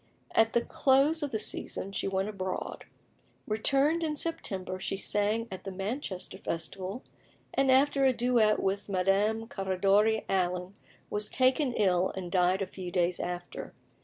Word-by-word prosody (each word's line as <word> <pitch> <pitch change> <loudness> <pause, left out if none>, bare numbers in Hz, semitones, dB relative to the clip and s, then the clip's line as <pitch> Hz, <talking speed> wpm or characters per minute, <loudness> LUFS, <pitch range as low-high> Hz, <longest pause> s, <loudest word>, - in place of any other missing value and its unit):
At 225 0 +3
the 235 - +3
close 275 +6 +3
of 290 - -1
the 225 - -1
season 195 -2 -4
she 195 - -2
went 195 0 0
abroad. 190 -3 -4 0.6
Returned 275 +9 +2
in 310 -2 -1
September, 195 - -3
she 195 - -3
sang 210 +3 0
at 185 -1 -7
the 195 - -5
Manchester 195 -1 -4
Festival, 185 +6 -4 0.5
and 270 0 +2
after 275 +1 +4
a 265 - +6
duet 240 -3 +3
with 195 +1 -1
Madame 200 +4 +1
Caradori 200 +2 +2
Allen, 180 0 0 0.4
was 210 0 -1
taken 255 +1 +2
ill, 185 -3 +2
and 180 -2 -5
died 185 +1 +3
a - - -2
few 185 -1 -7
days 175 0 0
after. 175 0 -5
200 Hz, 150 wpm, -30 LUFS, 185-245 Hz, 0.6 s, a